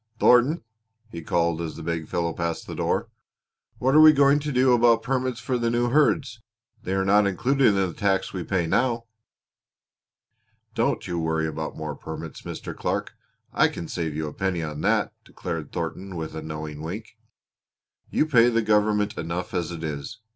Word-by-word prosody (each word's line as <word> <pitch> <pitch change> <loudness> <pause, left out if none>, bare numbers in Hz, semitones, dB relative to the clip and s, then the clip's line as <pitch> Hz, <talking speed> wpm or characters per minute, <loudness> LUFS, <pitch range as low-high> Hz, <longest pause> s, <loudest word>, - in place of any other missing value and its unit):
Thornton," 125 +6 +4 0.5
he 85 - -6
called, 85 0 0
as 80 -2 -5
the - - -8
big 80 -1 -3
fellow 85 -1 -1
passed 85 -1 -3
the - - -7
door, - - -1 0.7
"what 130 +2 +1
are 155 - +8
we 155 0 +10
going 140 0 +4
to 150 0 -3
do 130 -1 +4
about 120 -1 +4
permits 130 -2 -1
for 125 +2 -2
the 115 -1 +1
new 120 +1 +1
herds? 135 -4 +2 0.4
They 95 - -3
are 95 0 +1
not 100 +1 +4
included 130 +7 +2
in 105 - +4
the 95 -3 0
tax 95 -2 0
we 95 - -3 0.2
now 120 +8 +2
pay." - - -34 1.7
"Don't - - 0
you 85 -1 -2
worry 80 -1 0
about 80 0 -4
more 75 -2 -4
permits, 80 0 -8
Mr. - - -7
Clark. - - -2 0.4
I - - +4
can 85 - -6
save 80 -3 -3
you 80 0 -2
a 75 - -6
penny 95 -3 -1
on 75 -1 -5
that," - - +1
declared 80 -5 -6
Thornton 95 0 -5
with 80 -1 -5
a 80 - -4
knowing 75 -1 -6
wink. 100 +8 -7 0.9
"You - - +2
pay 120 -6 +5
the 115 -1 +1
government 105 -1 +2
enough 85 +3 -4
as 90 -2 -1
it 85 -2 -6
is. 70 -3 -5
95 Hz, 185 wpm, -25 LUFS, 80-120 Hz, 1.7 s, we